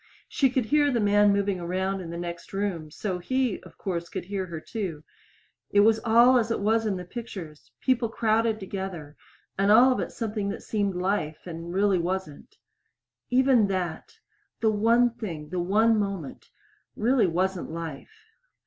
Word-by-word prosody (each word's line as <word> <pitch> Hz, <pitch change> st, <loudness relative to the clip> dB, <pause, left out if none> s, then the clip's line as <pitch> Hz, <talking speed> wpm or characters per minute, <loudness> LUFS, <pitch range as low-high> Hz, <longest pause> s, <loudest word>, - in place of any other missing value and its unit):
She 270 Hz, -, +2 dB
could 250 Hz, -2 st, 0 dB
hear 290 Hz, +5 st, +3 dB
the 245 Hz, -4 st, +1 dB
man 205 Hz, 0 st, +4 dB
moving 200 Hz, -2 st, 0 dB
around 190 Hz, +2 st, -2 dB
in 170 Hz, -, -7 dB
the 170 Hz, -, -5 dB
next 175 Hz, +1 st, -7 dB
room 195 Hz, -6 st, -2 dB
so 185 Hz, +3 st, -4 dB
he, 255 Hz, +4 st, -1 dB
of 175 Hz, -3 st, -16 dB
course, 170 Hz, -3 st, -4 dB
could -, -, -5 dB
hear 190 Hz, -1 st, -3 dB
her, 165 Hz, -2 st, -6 dB
too. 170 Hz, -4 st, -5 dB, 0.7 s
It 205 Hz, -, +4 dB
was 220 Hz, +1 st, +4 dB
all 240 Hz, +3 st, +5 dB
as 225 Hz, -1 st, -1 dB
it 230 Hz, -, -1 dB
was 220 Hz, +2 st, +1 dB
in 200 Hz, -, 0 dB
the 180 Hz, -, -7 dB
pictures 180 Hz, -8 st, -8 dB
people 250 Hz, -3 st, +1 dB
crowded 225 Hz, 0 st, +1 dB
together, 190 Hz, -6 st, -6 dB, 0.4 s
and 200 Hz, +1 st, +4 dB
all 245 Hz, +4 st, +7 dB
of 255 Hz, -, 0 dB
it -, -, -3 dB
something 215 Hz, -3 st, -3 dB
that 200 Hz, -, -6 dB
seemed 205 Hz, -3 st, -1 dB
life 180 Hz, -4 st, -2 dB
and 170 Hz, -1 st, -7 dB
really 195 Hz, 0 st, +2 dB
wasn't. 185 Hz, -, -4 dB, 0.7 s
Even 255 Hz, -4 st, +4 dB
that 185 Hz, -4 st, -4 dB, 0.4 s
the 220 Hz, -1 st, +2 dB
one 230 Hz, +3 st, +3 dB
thing, 170 Hz, -11 st, -7 dB
the 180 Hz, +2 st, -3 dB
one 215 Hz, +5 st, +3 dB
moment 195 Hz, -8 st, -4 dB, 0.5 s
really 240 Hz, 0 st, +3 dB
wasn't 185 Hz, +2 st, -1 dB
life. 160 Hz, -3 st, -8 dB
200 Hz, 170 wpm, -26 LUFS, 175-225 Hz, 0.7 s, all